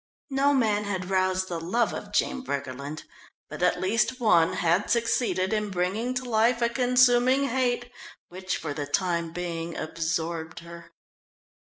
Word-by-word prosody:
No 275 +1 +3
man 215 -6 +1
had 190 -2 -3
roused 185 0 +1
the 170 -2 -4
love 205 +9 0
of - - -7
Jean 265 - 0
Briggerland, 140 - -5 0.5
but - - -7
at 180 - +2
least 230 +6 0
one 175 -9 +4
had 170 +3 +1
succeeded 230 -4 +1
in 210 -1 -1
bringing 200 +7 -1
to 255 0 -3
life 235 +1 +2
a 235 - +3
consuming 250 +2 +4
hate 245 -1 0 0.4
which, 185 +1 -4
for 150 -3 -4
the 145 -1 -4
time 170 +1 0
being, 170 -1 -4
absorbed 165 0 -3
her. 170 0 -11
185 Hz, 150 wpm, -26 LUFS, 170-240 Hz, 0.5 s, one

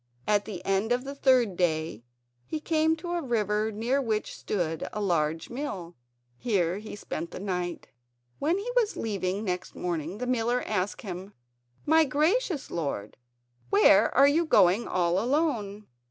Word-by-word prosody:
At 205 -1 +2
the 190 -5 -7
end 195 +4 +1
of 245 +1 +1
the 275 +1 -6
third 255 -8 +3
day 160 - 0 0.4
he 310 - -4
came 315 0 +2
to 345 +2 -6
a 350 -1 -1
river 215 - 0
near 235 +6 0
which 220 -4 -2
stood 165 -6 -2
a 210 - -4
large 165 -4 0
mill. 195 - -5 0.4
Here 190 -5 0
he 215 0 -8
spent 170 -4 -5
the - - -8
night. 180 -3 -3 0.5
When 325 +6 +1
he 440 +5 -3
was 455 -4 +2
leaving 200 -2 -2
next 180 -3 -3
morning 170 +1 -3
the 250 - -3
miller 245 0 0
asked 205 -2 -2
him: 190 0 -7 0.5
"My 320 +1 +5
gracious 315 - 0
lord, 140 -11 -3 0.5
where 200 +2 +5
are 275 +2 +7
you 310 +4 +3
going 205 - +4
all 175 0 +1
alone?" 235 -7 0
210 Hz, 155 wpm, -28 LUFS, 180-275 Hz, 0.5 s, are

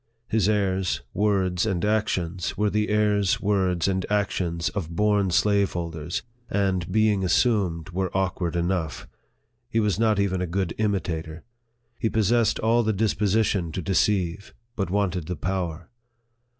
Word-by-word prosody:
His 110 -3 +2
airs, 95 -3 0
words, 95 -3 +1
and 90 0 0
actions, 95 -5 -1
were 105 -1 +1
the 105 0 0
airs, 105 -2 +2
words, 95 -4 +1
and 95 -1 0
actions 90 -5 0
of 90 -6 -4
born 105 0 +2
slaveholders, 85 -4 0 0.3
and, 95 -3 0
being 105 -1 +2
assumed, 90 -4 +1
were 95 +1 -1
awkward 90 -2 -1
enough. 85 -2 -2 0.6
He 115 - +1
was 105 -3 +1
not 110 -3 +3
even 95 -2 0
a 90 - -1
good 90 0 -1
imitator. 85 -6 -2 0.6
He 110 - +1
possessed 110 +2 +2
all 115 +2 +2
the 110 -1 0
disposition 105 -3 +1
to 95 - -3
deceive, 95 +1 0 0.2
but 100 -6 -2
wanted 90 -4 -1
the 90 - -3
power. 85 0 -3
95 Hz, 135 wpm, -25 LUFS, 90-105 Hz, 0.6 s, not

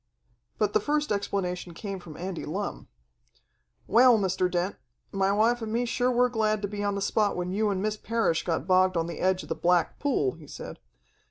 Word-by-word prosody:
But - - +1
the 430 - +4
first 300 -4 -1
explanation 180 -4 -2
came 195 0 -5
from 165 -4 -11
Andy 180 0 -5
Lumm. 195 +6 -4 1.0
"Well, 240 +2 +6
Mr. 185 -2 +1
Dent, 180 +2 -1 0.3
my 195 0 +1
wife 230 +4 +2
and 220 -1 -4
me 235 +2 0
sure 245 +1 +1
were 250 0 +3
glad 215 -3 0
to - - 0
be 205 0 -4
on 205 -1 0
the 200 - -2
spot 210 0 +1
when 180 0 -2
you 210 +2 +1
and 195 -1 -1
Miss 215 0 -1
Parrish 225 -7 0
got 165 -5 -1
bogged 185 0 +3
on 165 - +1
the 170 - -6
edge 185 0 +1
of - - -12
the - - +1
Black 175 -1 +1
Pool," 255 - +1
he 160 0 -14
said. - - -8
200 Hz, 205 wpm, -27 LUFS, 180-220 Hz, 1.0 s, Well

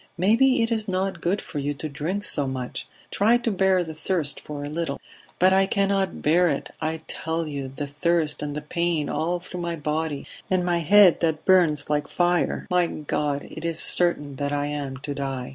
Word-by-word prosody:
"Maybe 230 +7 +4
it 230 - -1
is 220 -1 -1
not 190 -2 -1
good 190 +4 0
for 150 - -5
you 145 +1 -2
to 155 - -5
drink 160 +8 -3
so 145 -8 0
much. 130 -2 -5 0.2
Try 225 +4 +4
to 235 -1 -1
bear 190 -2 +3
the 160 -2 -7
thirst 155 -2 -1
for 145 -1 -7
a - - -4
little." 155 -1 -3 0.4
"But 185 +1 +5
I 190 0 +4
cannot 195 -1 0
bear 175 +3 +4
it, 140 - -3
I 160 0 -2
tell 160 0 -3
you 140 -3 -5
the 145 - -3
thirst 155 +2 0
and 145 -1 -4
the 150 - -4
pain 170 -1 -1
all 170 +4 -1
through 180 0 -7
my 170 -1 -2
body, 150 -1 -2 0.2
and 185 -1 +1
my 175 -1 +1
head 190 +2 +6
that 160 -2 -1
bums 165 -6 +4
like 150 -1 0
fire... 175 +2 +1
My 180 -1 +3
God! 145 -2 -2
It 160 - -8
is 165 -1 -1
certain 145 -6 +1
that 140 +1 -2
I 145 0 0
am 145 -2 -4
to 145 - -3
die." 135 -3 -4
165 Hz, 205 wpm, -24 LUFS, 145-180 Hz, 0.4 s, head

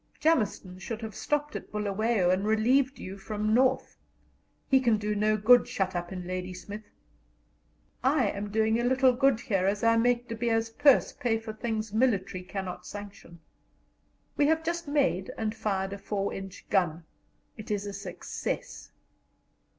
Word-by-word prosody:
Jameson 210 - +1
should 225 +3 -6
have 220 -1 -5
stopped 295 +6 -2
at - - -7
Bulawayo 210 -2 +1
and 185 +1 +1
relieved 255 +5 +2
you 195 +1 -8
from 215 +1 -2
North. 260 +2 +2 0.7
He 270 - +5
can 235 -4 +3
do 210 0 -2
no 215 +1 +2
good 245 +4 +6
shut 190 -6 -2
up 175 +1 -3
in 180 -1 -6
Ladysmith[.] 185 +3 -5 1.2
I 260 -4 +3
am 205 +1 -5
doing 220 +2 +2
a - - 0
little 260 +1 +4
good 265 -2 +2
here 195 -7 0
as 200 +2 0
I 230 0 +4
make 245 +1 +2
De 230 - -5
Beers 225 0 0
purse 275 +3 +4
pay 235 -3 0
for 225 -1 -7
things 215 -1 -3
military 205 -6 +1
cannot 185 -1 -6
sanction[.] 200 -4 -10 1.0
We 290 - +4
have 320 +1 +2
just 340 0 -3
made 275 -10 +1
and 215 -1 -1
fired 200 -3 -2
a 200 - -7
4 200 0 -2
inch 195 0 -8
gun, 175 -4 +1 0.5
it 215 +1 -10
is 205 -1 -1
a 200 - -5
success. - - -5
215 Hz, 160 wpm, -28 LUFS, 195-245 Hz, 1.2 s, good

